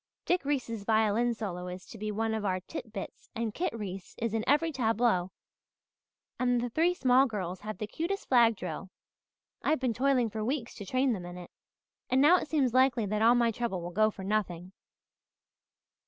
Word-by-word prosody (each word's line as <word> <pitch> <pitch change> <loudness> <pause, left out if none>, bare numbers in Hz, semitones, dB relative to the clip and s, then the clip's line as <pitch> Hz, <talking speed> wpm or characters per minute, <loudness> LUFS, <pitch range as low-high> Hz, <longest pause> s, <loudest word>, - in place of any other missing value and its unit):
Dick 360 -2 +1
Reese's 245 -7 -2
violin 220 +2 +2
solo 180 -5 -5
is 180 +1 -7
to - - -12
be 215 0 -3
one 220 +1 -1
of 220 -1 -2
our 185 -2 0
titbits 205 +2 -8
and 225 -2 -2
Kit 360 - -1
Reese 195 -4 -7
is 230 -1 -2
in 225 -1 0
every 310 +4 +3
tableau 225 - +1 1.1
and 245 -1 +2
the 240 0 -3
three 340 +6 +2
small 260 -2 +4
girls 190 -5 -4
have 215 -2 -6
the 210 - -3
cutest 340 - -3
flag 235 -3 +5
drill. 190 -1 -6 0.7
I've 310 - +1
been 255 -3 0
toiling 250 -1 +2
for 215 0 -3
weeks 250 0 -2
to 200 - -8
train 255 +3 +2
them 180 -4 -5
in 175 0 -8
it, 175 -1 -10 0.6
and 260 - +3
now 305 +6 +7
it - - -4
seems 270 -6 +2
likely 255 -3 +3
that 210 +1 -1
all 235 +2 +6
my 235 -1 +3
trouble 225 -4 -2
will 175 +1 -6
go 215 +4 +3
for 200 -2 -9
nothing. 185 -3 -2
225 Hz, 190 wpm, -30 LUFS, 200-255 Hz, 1.1 s, now